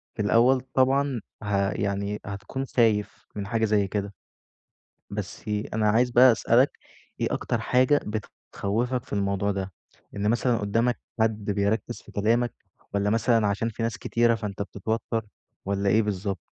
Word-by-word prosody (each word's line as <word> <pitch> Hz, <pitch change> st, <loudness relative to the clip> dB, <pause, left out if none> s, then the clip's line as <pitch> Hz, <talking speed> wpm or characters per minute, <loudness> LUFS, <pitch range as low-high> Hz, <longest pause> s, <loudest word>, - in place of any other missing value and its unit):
في 110 Hz, -, -2 dB
الأول 120 Hz, +5 st, +4 dB
طبعًا 135 Hz, -2 st, +2 dB, 0.2 s
ه 100 Hz, -1 st, +1 dB
يعني 100 Hz, +1 st, -2 dB
هتكون 100 Hz, +7 st, -5 dB
خايف 110 Hz, -5 st, +1 dB
من 100 Hz, -1 st, -4 dB
حاجة 110 Hz, 0 st, +1 dB
زي 105 Hz, -2 st, +2 dB
كده. 100 Hz, 0 st, -3 dB, 1.0 s
بس -, -, -6 dB, 0.3 s
أنا 110 Hz, -1 st, +2 dB
عايز 120 Hz, +3 st, +3 dB
بقى 125 Hz, +1 st, +7 dB
أسألك، 120 Hz, +4 st, +3 dB, 0.5 s
إيه -, -, +1 dB
أكتر -, -, -1 dB
حاجة 130 Hz, +3 st, +3 dB
بتخوفك 110 Hz, +3 st, -3 dB
في -, -, -9 dB
الموضوع 100 Hz, 0 st, 0 dB
ده؟ 95 Hz, -1 st, -4 dB, 0.4 s
إن 105 Hz, +1 st, 0 dB
مثلًا 120 Hz, 0 st, +2 dB
قدامك 115 Hz, +4 st, 0 dB, 0.2 s
حد 110 Hz, -2 st, +1 dB
بيركِز 100 Hz, +1 st, -1 dB
في -, -, -16 dB
كلامك 115 Hz, +3 st, +1 dB, 0.4 s
والّا 100 Hz, 0 st, +1 dB
مثلًا 115 Hz, -1 st, +3 dB
عشان 100 Hz, +3 st, 0 dB
في 115 Hz, +1 st, -5 dB
ناس 115 Hz, -1 st, -1 dB
كتيرة 115 Hz, 0 st, +2 dB
فأنت 105 Hz, -3 st, -5 dB
بتتوتر 110 Hz, +3 st, -3 dB, 0.4 s
والّا 100 Hz, 0 st, 0 dB
إيه 110 Hz, +3 st, +4 dB
بالضبط؟ 100 Hz, -3 st, -2 dB
110 Hz, 150 wpm, -26 LUFS, 100-120 Hz, 1.0 s, بقى